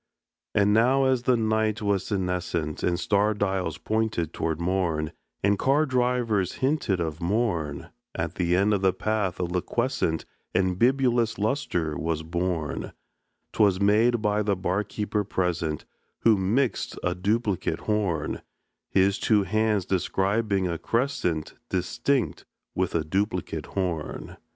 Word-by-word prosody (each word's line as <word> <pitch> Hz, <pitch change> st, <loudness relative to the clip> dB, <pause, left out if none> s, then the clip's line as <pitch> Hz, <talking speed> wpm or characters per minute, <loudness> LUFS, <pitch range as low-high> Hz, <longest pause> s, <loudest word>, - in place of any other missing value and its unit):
And 105 Hz, 0 st, +4 dB
now 125 Hz, +5 st, +4 dB
as 130 Hz, -2 st, +2 dB
the 125 Hz, 0 st, +3 dB
night 110 Hz, 0 st, +1 dB
was 100 Hz, -3 st, 0 dB
senescent, 90 Hz, -5 st, -2 dB
And 85 Hz, 0 st, +1 dB
star 105 Hz, +3 st, +2 dB
dials 95 Hz, -5 st, -1 dB
pointed 110 Hz, -7 st, -1 dB
to 80 Hz, 0 st, -1 dB
morn, 85 Hz, -2 st, -1 dB, 0.3 s
And 100 Hz, 0 st, +3 dB
car 145 Hz, +4 st, +3 dB
drivers 125 Hz, -, +1 dB
hinted 130 Hz, -, 0 dB
of 80 Hz, -1 st, -3 dB
morn, 85 Hz, -6 st, -1 dB, 0.3 s
At 80 Hz, 0 st, -2 dB
the 90 Hz, -1 st, +1 dB
end 100 Hz, +3 st, +3 dB
of 100 Hz, -, +1 dB
the 95 Hz, -1 st, +3 dB
path 105 Hz, -5 st, -1 dB
a -, -, 0 dB
liquescent 85 Hz, -2 st, -1 dB, 0.3 s
And 95 Hz, -1 st, +1 dB
bibulous 120 Hz, -2 st, +3 dB
lustre 100 Hz, -, -1 dB
was 80 Hz, 0 st, -2 dB
born; 85 Hz, -2 st, -2 dB, 0.6 s
'Twas 100 Hz, -4 st, +3 dB
made 110 Hz, +3 st, +3 dB
by 105 Hz, 0 st, +2 dB
the 105 Hz, -1 st, +1 dB
bar 95 Hz, +2 st, 0 dB
keeper 105 Hz, 0 st, -2 dB
present, 85 Hz, -5 st, -1 dB, 0.4 s
Who 115 Hz, -2 st, +5 dB
mixed 110 Hz, +7 st, 0 dB
a 90 Hz, -, +1 dB
duplicate 100 Hz, -2 st, -1 dB
horn, 95 Hz, -8 st, -1 dB, 0.5 s
His 95 Hz, +1 st, +3 dB
two 105 Hz, -3 st, +3 dB
hands 105 Hz, 0 st, +1 dB
describing 95 Hz, +1 st, 0 dB
a 85 Hz, -2 st, -3 dB
crescent 115 Hz, -, -1 dB, 0.2 s
Distinct 105 Hz, +8 st, 0 dB, 0.3 s
with 90 Hz, -2 st, -1 dB
a 80 Hz, -, +2 dB
duplicate 90 Hz, -2 st, -2 dB
horn. 90 Hz, -5 st, -3 dB
95 Hz, 135 wpm, -26 LUFS, 85-110 Hz, 0.6 s, Who